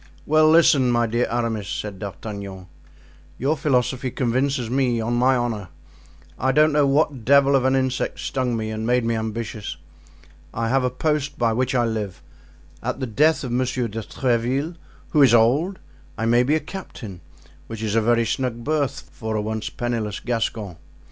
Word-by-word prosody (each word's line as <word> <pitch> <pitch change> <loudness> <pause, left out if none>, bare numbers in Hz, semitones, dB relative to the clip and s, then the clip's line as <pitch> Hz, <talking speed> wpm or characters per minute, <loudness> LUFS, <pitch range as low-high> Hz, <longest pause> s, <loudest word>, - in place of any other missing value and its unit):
"Well, 155 +1 +4
listen, 155 -5 +5
my 120 -1 +2
dear 120 +2 0
Aramis," 115 -4 -2
said 105 -3 -5
D'Artagnan; 100 -1 -7 0.7
"your 140 +5 +1
philosophy 130 -3 0
convinces 130 +1 0
me, 125 -1 +1
on 115 +2 -1
my 125 +2 +3
honor. 115 -5 -2 0.7
I 130 +2 +2
don't 155 +3 +4
know 145 -1 +3
what 140 -3 +1
devil 140 +2 +5
of 130 -1 +2
an 130 0 +3
insect 130 -1 -1
stung 125 -3 -1
me 110 0 -3
and 110 +1 -3
made 125 -1 +2
me 115 - +1
ambitious. 110 -3 -4 0.8
I 115 0 -1
have 135 +1 +2
a 125 - +2
post 145 +2 -1
by 115 -2 +2
which 130 +2 0
I 120 -1 +3
live; 105 -5 -4 0.6
at - - -3
the 130 - -2
death 150 +8 +2
of 125 - -4
Monsieur 125 0 0
de 115 +1 -5
Tréville, 130 - -1 0.3
who 150 - +3
is 125 -4 +7
old, 140 - +3 0.4
I 115 - -1
may 120 +1 +4
be 140 +5 +2
a - - +2
captain, 125 - -9 0.5
which 110 -1 -6
is 105 -2 -1
a 115 - +3
very 115 +1 +2
snug 120 -2 -2
berth 140 -2 -1
for 110 0 -4
a 105 - 0
once 110 0 -3
penniless 115 -4 -3
Gascon. 110 -6 -3
120 Hz, 175 wpm, -23 LUFS, 110-135 Hz, 0.8 s, is